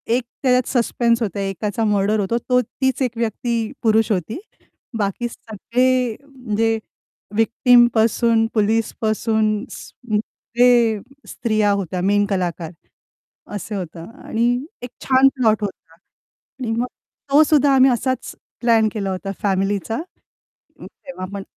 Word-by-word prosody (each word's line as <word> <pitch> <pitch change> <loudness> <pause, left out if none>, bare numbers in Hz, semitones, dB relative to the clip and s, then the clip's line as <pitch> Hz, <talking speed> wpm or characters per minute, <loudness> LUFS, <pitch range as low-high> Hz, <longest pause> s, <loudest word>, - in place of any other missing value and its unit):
एक 250 - 0 0.2
त्याच्यात 250 -1 +3
सस्पेन्स 235 -1 +1
होता, 200 -2 -2
एकाचा 200 +3 -2
मर्डर 210 +1 +1
होतो. 205 +4 0
तो 250 +1 +1
तीच 265 +3 -2
एक 250 - +1
व्यक्ती 235 +1 -2 0.3
पुरुष 220 0 +3
होती. 200 - -2 0.6
बाकी 210 +3 -1
सगळे 245 +2 -1
म्हणजे 225 -5 -1 0.6
व्हिक्टिम 240 +2 +5
पासून 225 0 +3
पोलिस 220 +1 +1
पासून 215 0 0
स् - - -10 0.7
ते 250 - +7 0.6
स्त्रिया 215 -3 0
होत्या 185 -2 -2
मेन 205 +2 +2
कलाकार, 180 -4 -2 0.8
असे 205 +2 -5
होतं 170 -3 -6 0.2
आणि 230 +2 +1 0.3
एक 245 - -6 0.2
छान 265 0 +5
प्लॉट 220 -4 +2
होता. 190 -4 -7
आणि 225 +6 -11
मग 235 +2 -1 0.4
तो 300 +2 +7
सुद्धा 290 -2 +3
आम्ही 260 0 +6
असाच 260 +2 -2 0.3
प्लॅन 230 -2 +4
केला 200 -3 -3
होता 190 +1 -4
फॅमिलीचा, 200 +2 0 0.9
अं, - - -9
तेव्हापण 200 -7 -8
225 Hz, 125 wpm, -20 LUFS, 205-245 Hz, 0.9 s, ते